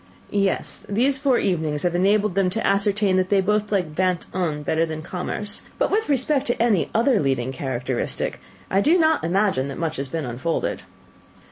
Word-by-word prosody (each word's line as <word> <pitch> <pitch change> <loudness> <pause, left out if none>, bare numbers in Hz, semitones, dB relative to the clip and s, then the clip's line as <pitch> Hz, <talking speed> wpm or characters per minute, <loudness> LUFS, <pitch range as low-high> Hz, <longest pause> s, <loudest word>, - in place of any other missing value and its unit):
"Yes: 200 -2 0
these 260 +7 +2
four 270 -3 +3
evenings 160 -6 -1
have 175 -1 +1
enabled 200 +3 +2
them 190 -1 +2
to 225 +5 -2
ascertain 200 -1 +2
that 185 0 +1
they 200 - +4
both 210 +2 0
like 180 -7 0
Vingt 185 +1 0
un 160 -5 -2
better 160 +2 +1
than 155 -1 -4
Commerce, 205 +4 -3 0.2
but - - +1
with 435 -2 0
respect 280 +1 +1
to 240 - -1
any 225 -6 +2
other 235 0 +3
leading 130 -4 0
characteristic, 130 -2 -3 0.3
I 195 - +3
do 320 - +4
not 320 -2 +3
imagine 180 -6 +1
that 140 - -6
much 160 -2 -2
has 135 +1 -3
been 155 +2 -3
unfolded." 130 +7 -2
190 Hz, 180 wpm, -23 LUFS, 160-210 Hz, 0.3 s, they